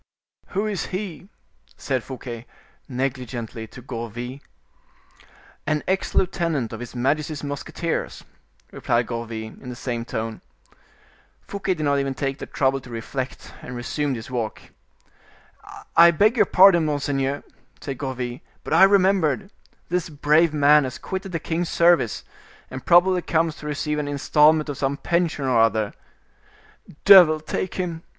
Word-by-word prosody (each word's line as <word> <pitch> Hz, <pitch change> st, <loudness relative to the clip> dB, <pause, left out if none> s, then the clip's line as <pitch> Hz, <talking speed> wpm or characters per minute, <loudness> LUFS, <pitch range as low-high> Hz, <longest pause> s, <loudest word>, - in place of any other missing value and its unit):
"Who 200 Hz, +2 st, +1 dB
is 210 Hz, -3 st, -2 dB
he?" 185 Hz, -1 st, -6 dB, 0.5 s
said 130 Hz, -4 st, -2 dB
Fouquet, 125 Hz, -3 st, -8 dB, 0.4 s
negligently, 125 Hz, -3 st, -4 dB
to 125 Hz, +2 st, -13 dB
Gourville. 120 Hz, +1 st, -6 dB, 1.3 s
"An 150 Hz, 0 st, 0 dB
ex 190 Hz, +1 st, -1 dB
lieutenant 165 Hz, -10 st, 0 dB
of 110 Hz, -, -6 dB
his 120 Hz, 0 st, -8 dB
majesty's 150 Hz, +4 st, -1 dB
musketeers," 155 Hz, +4 st, -4 dB, 0.5 s
replied 120 Hz, +1 st, 0 dB
Gourville, 115 Hz, -2 st, -6 dB
in 125 Hz, -, -9 dB
the 125 Hz, -, -6 dB
same 120 Hz, -1 st, -4 dB
tone. 110 Hz, -1 st, -5 dB, 1.0 s
Fouquet 195 Hz, -2 st, -3 dB
did 155 Hz, -, -4 dB
not 140 Hz, -1 st, +2 dB
even 135 Hz, -1 st, -2 dB
take 135 Hz, 0 st, -3 dB
the -, -, -7 dB
trouble 135 Hz, 0 st, 0 dB
to 125 Hz, -, -14 dB
reflect, 125 Hz, +3 st, -6 dB
and 125 Hz, -, -8 dB
resumed 135 Hz, +3 st, -2 dB
his 115 Hz, +2 st, -8 dB
walk. 115 Hz, -4 st, -3 dB, 1.3 s
"I 170 Hz, +1 st, +9 dB
beg 205 Hz, +8 st, +3 dB
your -, -, +3 dB
pardon, 185 Hz, -3 st, +6 dB
monseigneur!" 140 Hz, -2 st, -1 dB, 0.4 s
said 135 Hz, -3 st, -6 dB
Gourville, 130 Hz, -2 st, -4 dB, 0.2 s
"but -, -, -3 dB
I -, -, +5 dB
have 195 Hz, -, +8 dB
remembered; 190 Hz, -1 st, +2 dB, 0.4 s
this 175 Hz, -1 st, -1 dB
brave 155 Hz, +2 st, +3 dB
man 150 Hz, 0 st, +5 dB
has 130 Hz, -1 st, -5 dB
quitted 190 Hz, 0 st, -5 dB
the 165 Hz, -, -1 dB
king's 165 Hz, +2 st, -2 dB
service, 170 Hz, -9 st, +3 dB, 0.5 s
and 130 Hz, 0 st, -8 dB
probably 180 Hz, +1 st, +5 dB
comes 165 Hz, -1 st, 0 dB
to 150 Hz, -, -8 dB
receive 150 Hz, 0 st, -2 dB
an 145 Hz, -, -3 dB
installment 150 Hz, +2 st, +3 dB
of 145 Hz, -2 st, -5 dB
some 140 Hz, 0 st, -1 dB
pension 170 Hz, -4 st, 0 dB
or 125 Hz, -3 st, +2 dB
other." 110 Hz, -2 st, +2 dB, 1.1 s
"Devil 180 Hz, -6 st, +8 dB
take 155 Hz, +4 st, -4 dB
him!" 170 Hz, -3 st, -3 dB
145 Hz, 145 wpm, -23 LUFS, 125-170 Hz, 1.3 s, I